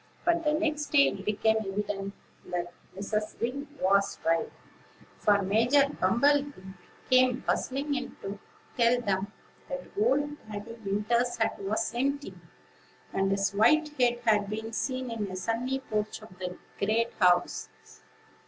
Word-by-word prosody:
But, 340 -1 +2
the 300 -1 +2
next 305 -1 0
day, 280 -2 +5
it 195 - -7
became 215 +2 +2
evident 200 -1 -3 0.3
that 175 -1 -3 0.2
Mrs. 210 +2 -3
Wing 270 +5 -2
was 200 +1 +2
right; 165 0 +1 0.7
for 205 -1 +3
Major 235 +8 +4
Bumble 280 +6 +3
bee 190 -10 -10 0.3
came 255 0 +4
buzzing 280 +3 -1
in 260 -2 -4
to 195 +1 -5 0.4
tell 240 0 +4
them 200 -3 -1 0.4
that - - -4
old 295 -10 +1
Daddy 215 +2 -6
Winter's 225 +5 0
hut 225 -1 0
was 215 +3 -1
empty, 280 +4 -1 0.8
and 195 0 +1
his 195 0 +1
white 305 +10 +4
head 240 -1 +3
had 210 -3 +3
been 220 +1 -4
seen 255 +1 -2
in 225 -2 -2
the 185 - -6
sunny 230 +8 -1
porch 215 -3 -3
of 200 -4 -13
the 180 -1 -5 0.2
great 225 +3 +1
house. 180 -2 +3
225 Hz, 145 wpm, -29 LUFS, 200-265 Hz, 0.8 s, day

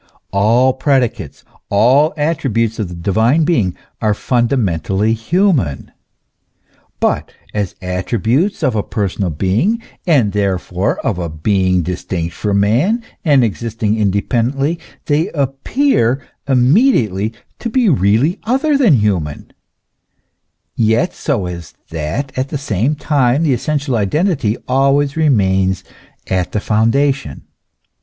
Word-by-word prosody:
All 115 +7 +3
predicates, 130 -3 -1 0.3
all 130 +10 +4
attributes 120 -8 0
of 105 - -1
the 90 - -7
divine 110 - +2
being 120 - +1 0.3
are 105 -1 +1
fundamentally 110 - 0
human; 125 - 0 1.1
but - - 0 0.2
as 100 -3 -2
attributes 115 - -1
of 130 -4 +2
a 105 - +1
personal 100 -3 -2
being, 100 - 0 0.3
and 130 - +3
therefore 95 -1 -1
of 100 -5 0
a 85 -2 -3
being 90 +3 +1
distinct 85 -1 -4
from 100 -2 0
man 155 - +1 0.2
and 145 -6 +4
existing 110 -1 -1
independently, 120 - 0 0.3
they 150 +3 +1
appear 135 - 0 0.2
immediately 125 - +3 0.3
to 235 - -3
be 245 0 +2
really 130 - +2
other 275 +5 +1
than 220 - +5
human, 95 - -1 1.2
yet 115 +10 +1
so 125 - -2
as 85 -2 -7 0.2
that 85 - -4
at 130 +1 -2
the 150 - -3
same 130 +1 -1
time 140 -1 +1
the 150 -5 +2
essential 140 +1 -1
identity 120 - 0
always 140 +2 +2
remains 95 - +2 0.4
at 90 -2 -2
the 105 - +1
foundation. 115 - 0
115 Hz, 115 wpm, -16 LUFS, 100-145 Hz, 1.2 s, than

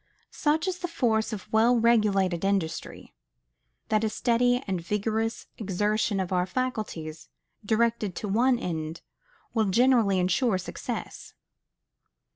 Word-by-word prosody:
Such 315 +4 0
is 365 -1 -2
the 355 - -3
force 230 -9 0
of 210 -4 -6
well 230 +3 +5
regulated 200 -6 +2
industry, 195 -5 -2 0.8
that 215 0 +2
a 220 - +1
steady 245 +3 +1
and 185 -3 -2
vigorous 220 +5 -2
exertion 210 +1 0
of 185 0 -2
our 180 0 +1
faculties, 200 -11 -4 0.3
directed 220 -2 +1
to 210 - -4
one 240 +5 +3
end, 160 -6 -4 0.5
will 220 -2 +2
generally 225 -1 +3
insure 190 +4 +2
success. 185 - -6
215 Hz, 120 wpm, -27 LUFS, 190-235 Hz, 0.8 s, well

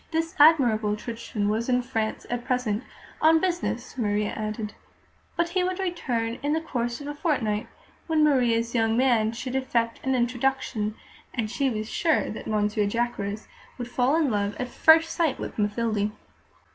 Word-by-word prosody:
This 325 0 -1
Admirable 235 -9 +5
Crichton 220 -2 -4
was 225 +4 -1
in 250 0 +2
France 225 -3 -2
at 245 0 -3
present, 250 -3 -1 0.4
on 320 +1 +6
business, 335 -9 -2
Maria 210 -2 0
added, 215 0 -4 0.6
but 340 0 +1
he 365 +1 +1
would 365 0 -1
return 250 -12 -2
in 290 +1 0
the 320 - +2
course 240 -6 -3
of - - -7
a 290 - -3
fortnight, 255 - -1 0.4
when 320 -2 +3
Maria's 235 -5 +2
"young 225 -1 +2
man" 235 -4 +3
should 255 +3 -5
effect 235 -3 0
an 265 -1 +1
introduction, 240 -3 0 0.4
as 220 -4 -2
she 270 +3 +1
was 215 -3 -3
sure 320 +6 +1
that 215 - -7
Monsieur 210 -1 +1
Jacques 240 +3 -1
would 210 +4 -7
fall 250 +3 +1
in 315 -5 +2
love 205 -1 -1
at 250 - -3
first 320 +3 +5
sight 320 -6 +1
with - - -6
Mathilde. 210 0 0
240 Hz, 165 wpm, -26 LUFS, 215-285 Hz, 0.6 s, on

